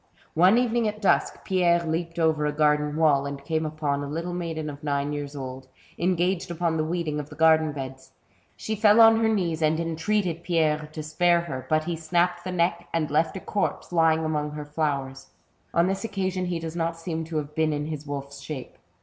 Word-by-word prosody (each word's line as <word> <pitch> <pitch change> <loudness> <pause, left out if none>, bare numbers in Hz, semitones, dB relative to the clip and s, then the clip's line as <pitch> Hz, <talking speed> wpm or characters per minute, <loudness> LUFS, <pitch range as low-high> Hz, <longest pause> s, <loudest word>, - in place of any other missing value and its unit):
One 185 +7 +5
evening 240 -2 +2
at 210 0 -3
dusk, 200 - +1
Pierre 175 -2 +2
leaped 165 +1 -3
over 160 -2 +2
a - - 0
garden 150 0 +2
wall, 145 -3 +3
and 140 0 -7
came 160 +1 0
upon 150 -2 -2
a - - -4
little 170 +4 -3
maiden 165 -3 -3
of 145 0 -8
nine 145 0 -1
years 145 0 -5
old, 130 -1 -7 0.3
engaged 180 +1 +1
upon 170 -1 -1
the 155 - +1
weeding 160 -2 -2
of 150 0 -6
the 150 - -11
garden 160 0 +4
beds. 130 -2 -8 0.5
She 220 - -3
fell 210 +1 +5
on 225 0 +8
her 225 -1 +3
knees 175 -7 0
and 155 +1 +2
entreated 170 +1 -1
Pierre 155 -3 0
to 155 - -5
spare 170 +3 +2
her; 130 -7 -6
but 155 0 +2
he 170 +1 -2
snapped 175 +2 0
the 185 - -4
neck, 175 0 0
and 155 -3 -1
left 160 +4 +1
her 190 - -5
a - - -22
corpse, 205 -2 -2
lying 160 -2 +3
among 150 -1 -1
her 150 -1 -6
flowers. 140 -3 -2 0.4
On 170 - +3
this 195 +3 -1
occasion 190 -4 -2
he 175 -1 -2
does 165 0 -6
not 165 0 -1
seem 165 -1 -4
to 160 0 -4
have 150 0 -4
been 160 0 +1
in 150 0 -2
his 150 -1 -6
wolfs 140 0 -6
shape. 135 -2 -7
160 Hz, 210 wpm, -26 LUFS, 150-175 Hz, 0.5 s, on